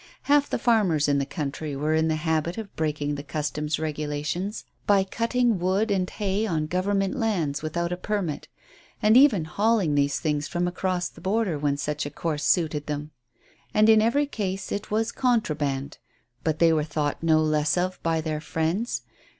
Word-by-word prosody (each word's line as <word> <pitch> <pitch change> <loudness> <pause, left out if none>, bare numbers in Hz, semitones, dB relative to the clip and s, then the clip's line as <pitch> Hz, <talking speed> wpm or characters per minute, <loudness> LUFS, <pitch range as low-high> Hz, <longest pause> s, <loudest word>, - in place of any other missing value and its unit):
Half 290 0 +3
the - - 0
farmers 190 - +2
in 140 -1 +2
the 140 - -2
country 145 -1 -4
were 150 +3 0
in 160 0 +2
the 160 - +1
habit 160 +2 -1
of 220 -3 -7
breaking 150 -2 -1
the 145 0 -5
Customs 150 +1 -2
regulations 155 +5 -3 0.2
by 200 -2 +5
cutting 230 +1 0
wood 190 +5 +1
and 185 -2 +1
hay 205 +1 -1
on 160 -5 0
Government 190 +3 0
lands 180 - -1
without 170 +2 -2
a 180 - -2
permit, 185 -5 -3 0.5
and 215 +1 +4
even 245 - +6
hauling 200 -1 +1
these 140 -1 +1
things 150 -3 -1
from 175 0 -1
across 180 0 -1
the - - -15
border 190 -5 0
when 145 -1 0
such 145 0 -2
a - - -5
course 150 0 -3
suited 155 -4 +1
them, 150 0 -4 0.6
and 215 +1 +5
in 220 -1 +7
every 240 +7 +2
case 195 -8 -4
it 205 - -3
was 225 +2 0
"contraband"; 150 - -1 0.4
but 155 -1 0
they 165 0 +5
were 155 -1 +2
thought 150 -1 -2
no 160 -1 +4
less 155 0 +1
of 185 +1 -1
by 165 -1 0
their 155 -1 -3
friends. 165 +9 -1
165 Hz, 180 wpm, -25 LUFS, 150-205 Hz, 0.6 s, in